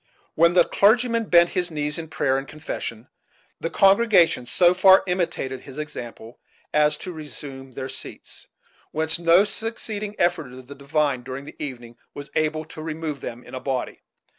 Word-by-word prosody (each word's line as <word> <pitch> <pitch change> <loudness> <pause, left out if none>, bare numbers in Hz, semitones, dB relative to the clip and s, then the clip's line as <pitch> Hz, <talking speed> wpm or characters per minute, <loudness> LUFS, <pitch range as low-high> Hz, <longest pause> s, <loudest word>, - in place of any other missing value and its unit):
When 170 +2 +4
the 175 - +6
clergyman 230 +2 +3
bent 170 -3 +5
his 180 -2 -1
knees 150 -1 -1
in 160 - -6
prayer 135 -3 0
and 135 - -9
confession, 130 -6 -6 0.5
the 165 - -3
congregation 195 - +4
so 175 +8 +4
far 190 +1 +6
imitated 170 -8 -2
his 135 0 -11
example 120 -6 -8 0.3
as 150 0 +3
to 185 - -7
resume 140 -4 -8
their 130 +1 -5
seats; 130 0 -9 0.4
whence 160 +2 -1
no 170 +3 +5
succeeding 215 -1 -4
effort 160 -7 0
of 130 0 -11
the 140 - -10
divine, 140 -1 0
during 130 +2 -7
the - - -8
evening, 120 -4 -8 0.2
was 145 0 -8
able 155 0 0
to 155 0 -10
remove 155 -3 -4
them 120 +1 -7
in - - -14
a 130 - -4
body. 130 -1 -3
155 Hz, 165 wpm, -23 LUFS, 135-175 Hz, 0.5 s, the